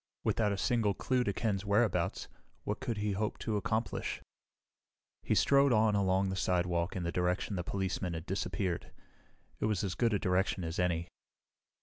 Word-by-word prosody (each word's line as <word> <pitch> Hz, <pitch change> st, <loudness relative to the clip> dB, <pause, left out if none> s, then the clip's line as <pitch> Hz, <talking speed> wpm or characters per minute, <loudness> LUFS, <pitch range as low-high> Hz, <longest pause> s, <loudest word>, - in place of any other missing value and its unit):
Without 105 Hz, -2 st, +1 dB
a 100 Hz, -, -1 dB
single 110 Hz, -2 st, +1 dB
clue 130 Hz, -1 st, +1 dB
to 100 Hz, -, 0 dB
Ken's 100 Hz, -1 st, -1 dB
whereabouts, 105 Hz, 0 st, +1 dB, 0.4 s
what 105 Hz, -, -2 dB
could 120 Hz, -5 st, -3 dB
he 105 Hz, 0 st, 0 dB
hope 105 Hz, +2 st, -1 dB
to 110 Hz, -, -2 dB
accomplish? 110 Hz, +3 st, -1 dB, 1.0 s
He -, -, 0 dB
strode 140 Hz, -1 st, +5 dB
on 110 Hz, -1 st, +4 dB
along 95 Hz, -1 st, +2 dB
the 95 Hz, -, -2 dB
sidewalk 90 Hz, -1 st, 0 dB
in 90 Hz, -, -2 dB
the 85 Hz, -, -1 dB
direction 90 Hz, +3 st, 0 dB
the 90 Hz, -, -2 dB
policeman 95 Hz, -1 st, -2 dB
had 80 Hz, +1 st, -6 dB
disappeared. 95 Hz, -1 st, -2 dB, 0.7 s
It -, -, 0 dB
was 105 Hz, -4 st, 0 dB
as 95 Hz, -2 st, -1 dB
good 115 Hz, -3 st, +2 dB
a -, -, +3 dB
direction 95 Hz, 0 st, 0 dB
as 80 Hz, +1 st, -3 dB
any. 85 Hz, -1 st, +1 dB
100 Hz, 170 wpm, -32 LUFS, 90-110 Hz, 1.0 s, strode